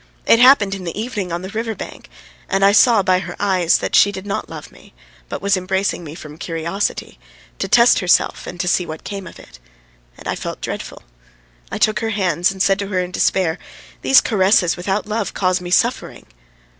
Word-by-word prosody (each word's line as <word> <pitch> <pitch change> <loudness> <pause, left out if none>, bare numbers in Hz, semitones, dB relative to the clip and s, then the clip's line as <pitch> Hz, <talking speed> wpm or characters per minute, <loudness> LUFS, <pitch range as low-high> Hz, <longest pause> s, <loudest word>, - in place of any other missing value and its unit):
It 230 - +5
happened 245 -6 +6
in 195 -2 -6
the 175 +3 -5
evening 210 -6 -4
on 170 +1 -4
the 190 - -6
river 225 +1 -4
bank, - - -10 0.4
and 195 0 +2
I 200 - +6
saw 220 0 +5
by 185 0 +2
her 175 -1 -7
eyes 185 -4 +2
that - - -3
she 205 - +5
did 190 0 -8
not 200 - -4
love - - -9
me, - - -19 0.3
but - - -6
was 200 0 +2
embracing 190 0 -2
me 155 -1 -9
from 155 -2 -11
curiosity, 170 +4 -4 0.4
to - - -2
test 240 0 +5
herself 180 -4 +1
and 175 - -8
to 180 - -3
see 180 - +2
what 155 -2 -8
came 195 -3 -7
of - - -12
it. 60 - -16 0.6
And - - -11
I - - 0
felt - - -6
dreadful. - - -6 0.7
I - - -3
took 215 -3 +2
her 225 - -2
hands 185 -4 +1
and 190 -1 -1
said 195 0 +2
to 200 - -3
her 190 -2 -1
in 180 0 -3
despair: 180 -2 0 0.4
"These 270 - +5
caresses 190 -4 +2
without 195 +3 -2
love 210 0 -3
cause 185 -1 0
me 175 - -7
suffering!" - - 0
190 Hz, 205 wpm, -19 LUFS, 180-205 Hz, 0.7 s, happened